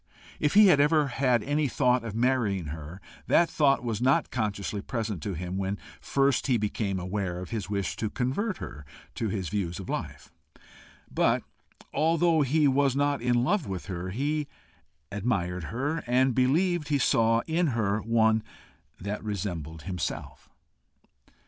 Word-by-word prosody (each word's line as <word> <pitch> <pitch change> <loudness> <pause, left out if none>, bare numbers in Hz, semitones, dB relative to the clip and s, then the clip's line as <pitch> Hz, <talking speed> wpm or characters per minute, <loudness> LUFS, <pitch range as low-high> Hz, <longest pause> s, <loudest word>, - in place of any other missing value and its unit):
If 150 +3 +1
he 210 0 +9
had 180 -7 +6
ever 150 0 +3
had 125 -3 +1
any 145 +1 +1
thought 125 -2 +2
of 110 -3 -5
marrying 115 - +1
her, 80 +3 -8 0.3
that 170 - +4
thought 140 -4 +3
was 115 -2 -2
not 130 +2 +2
consciously 105 -3 -2
present 110 - -3
to 95 +3 -3
him 90 +3 -4
when 100 +1 -2 0.2
first 140 0 +1
he 125 -3 +3
became 100 -2 -2
aware 90 0 -3
of 90 - -8
his 105 -5 -3
wish 100 -2 -2
to 110 - -2
convert 140 - -1
her 75 - -8 0.3
to 110 - -2
his 95 -4 -3
views 90 -5 -2
of 95 - -8
life. - - -5 0.8
But, - - +2 0.5
although 165 0 +3
he 145 +2 +3
was 135 -1 +2
not 145 -1 +1
in 120 0 +2
love 180 +3 +1
with 95 -2 -5
her, 90 -1 -4
he 145 +8 -1 0.6
admired 90 -5 -1
her, 140 - -2
and 130 +1 +3
believed 150 +6 +2
he 145 - +2
saw 115 -3 +3
in 165 +2 +1
her 110 -5 0
one 110 0 +3 0.6
that 100 +2 -4
resembled 85 -7 -4
himself. 90 -5 -5
115 Hz, 155 wpm, -28 LUFS, 100-140 Hz, 0.8 s, he